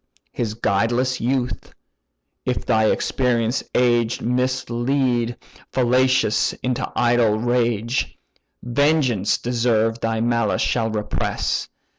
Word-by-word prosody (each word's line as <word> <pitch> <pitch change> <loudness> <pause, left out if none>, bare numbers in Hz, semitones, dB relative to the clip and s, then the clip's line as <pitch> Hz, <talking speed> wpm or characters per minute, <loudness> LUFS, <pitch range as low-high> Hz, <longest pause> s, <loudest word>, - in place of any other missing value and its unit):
His 110 -3 -3
guideless 120 +5 0
youth, 125 +1 -2 0.7
if - - -2
thy 110 0 +3
experienced 120 -1 0
age 120 -2 +2
Mislead 125 0 0 0.3
fallacious 130 -2 +2
into 125 -1 -2
idle 120 -3 +3
rage, 120 0 0 0.5
Vengeance 130 -5 +1
deserved 115 -2 0
thy 115 -1 -1
malice 115 -2 +1
shall 115 -2 0
repress. 105 -1 -2
120 Hz, 90 wpm, -21 LUFS, 115-125 Hz, 0.7 s, thy